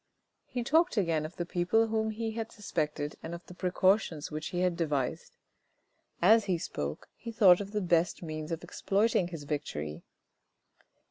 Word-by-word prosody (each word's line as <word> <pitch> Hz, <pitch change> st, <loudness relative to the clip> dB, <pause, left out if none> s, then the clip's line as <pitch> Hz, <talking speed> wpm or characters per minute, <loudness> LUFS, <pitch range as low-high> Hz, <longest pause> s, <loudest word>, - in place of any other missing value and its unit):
He 245 Hz, -1 st, -3 dB
talked 320 Hz, +4 st, +3 dB
again 165 Hz, -5 st, +1 dB
of 165 Hz, -, -16 dB
the 175 Hz, -, -3 dB
people 180 Hz, +6 st, +2 dB
whom 220 Hz, 0 st, 0 dB
he 225 Hz, +1 st, -3 dB
had 225 Hz, 0 st, -4 dB
suspected 150 Hz, -7 st, -3 dB
and 165 Hz, +1 st, -5 dB
of 170 Hz, -, -11 dB
the -, -, -11 dB
precautions 180 Hz, -3 st, +1 dB
which 155 Hz, 0 st, -4 dB
he 175 Hz, -, -2 dB
had 180 Hz, -1 st, +2 dB
devised. 145 Hz, -6 st, -2 dB, 0.9 s
As 220 Hz, +3 st, +6 dB
he 185 Hz, -3 st, +1 dB
spoke, 75 Hz, -, -5 dB
he 230 Hz, -, -7 dB
thought 195 Hz, -4 st, +6 dB
of 200 Hz, -, -6 dB
the 210 Hz, -1 st, -1 dB
best 175 Hz, -1 st, +1 dB
means 155 Hz, 0 st, -5 dB
of 165 Hz, +1 st, -3 dB
exploiting 195 Hz, +2 st, +1 dB
his 165 Hz, -4 st, -7 dB
victory. 80 Hz, -, -4 dB
175 Hz, 165 wpm, -30 LUFS, 155-215 Hz, 0.9 s, As